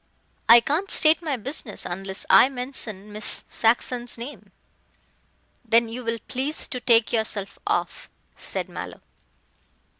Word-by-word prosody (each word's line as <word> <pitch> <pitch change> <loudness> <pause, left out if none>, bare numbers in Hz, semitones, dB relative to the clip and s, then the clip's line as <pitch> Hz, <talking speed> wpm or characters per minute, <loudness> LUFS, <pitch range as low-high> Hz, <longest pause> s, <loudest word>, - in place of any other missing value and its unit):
"I 235 +1 +9
can't 320 +11 -2
state 315 0 +4
my 300 -6 -2
business 245 -2 -2
unless 190 +2 -4
I 255 - +6
mention 245 -6 0
Miss 210 0 -3
Saxon's 240 +2 0
name." 245 +5 -10 1.1
"Then 230 0 +2
you 245 +2 -7
will 230 0 -2
please 275 +5 -2
to 255 - -4
take 230 -2 +3
yourself 215 -3 -2
off," - - -2 0.3
said - - -5
Mallow. - - -9
235 Hz, 125 wpm, -23 LUFS, 220-265 Hz, 1.1 s, I